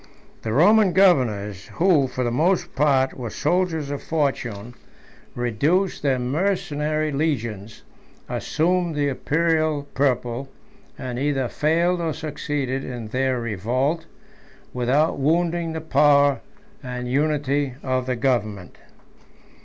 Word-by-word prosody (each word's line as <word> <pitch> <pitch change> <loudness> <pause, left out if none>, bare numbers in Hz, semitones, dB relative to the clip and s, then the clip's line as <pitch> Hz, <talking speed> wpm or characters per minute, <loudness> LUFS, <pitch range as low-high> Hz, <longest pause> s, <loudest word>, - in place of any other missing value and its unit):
The 110 - -3
Roman 195 - +5
governors, 110 - +2
who, 165 -6 +3
for 125 0 -3
the 120 - 0
most 170 +9 +1
part, 135 -2 +2
were 120 -3 -6
soldiers 165 - -1
of 145 - -4
fortune, 125 -8 -2 0.6
seduced 145 - 0
their 135 -3 +1
mercenary 155 +1 -1
legions, 115 -8 -3 0.4
assumed 175 0 0
the 145 -1 +1
Imperial 155 +1 0
purple, 130 -1 0 0.5
and 125 -1 -5
either 135 -2 0
failed 170 +6 +1
or 165 -2 -1
succeeded 145 -4 -3
in 120 -4 -6
their 130 +1 0
revolt, 125 - -1 0.7
without 135 +6 +1
wounding 165 +3 +1
the 160 - -4
power 145 -2 +4 0.4
and 125 -1 -5
unity 145 -1 0
of 130 -1 -1
government. 110 -8 -1
140 Hz, 110 wpm, -23 LUFS, 125-160 Hz, 0.7 s, Roman